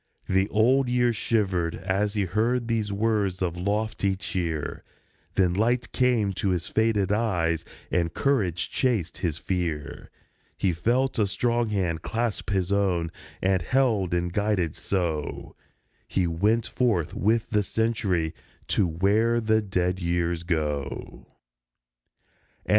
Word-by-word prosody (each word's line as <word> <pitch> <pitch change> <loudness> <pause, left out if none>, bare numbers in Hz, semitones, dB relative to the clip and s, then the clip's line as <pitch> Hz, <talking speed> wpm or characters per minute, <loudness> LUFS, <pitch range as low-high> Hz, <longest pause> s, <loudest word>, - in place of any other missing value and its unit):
The 95 +2 +2
Old 125 +4 +3
Year 120 -1 +2
shivered 95 -7 0
as 100 +2 -1
he 100 -2 +1
heard 115 +6 0
these 110 -3 0
words 100 -3 0
of 85 -2 -1
lofty 100 +1 0
cheer; 85 -5 -3 0.5
Then 90 -2 +3
light 120 +5 +1
came 120 -6 +2
to 95 +2 -1
his 90 -3 0
faded 110 -3 +1
eyes, 85 -7 +1 0.3
and 85 -2 +1
courage 100 - 0
chased 110 - 0
his 80 -4 -1
fear. 80 -6 -3 0.5
He 95 -3 +1
felt 120 +9 +1
a 105 - +3
strong 120 +3 0
hand 90 -6 -1
clasp 115 +1 -2
his 95 -2 0
own, 90 -5 +1 0.3
and, 95 -1 +2
held 110 -3 +1
and 85 0 -1
guided 100 -6 +1
so, 85 -6 -3 0.5
He 95 - +1
went 105 +8 +1
forth 110 -11 0
with 110 +2 +1
the 105 -1 +3
Century 100 -7 0 0.4
to 95 - +2
where 105 +8 +2
the 110 -1 +2
dead 90 -2 -1
Years 85 -1 0
go 80 -4 0
104 - - -9 1.4
A. - - -14
100 Hz, 135 wpm, -26 LUFS, 85-110 Hz, 1.4 s, Old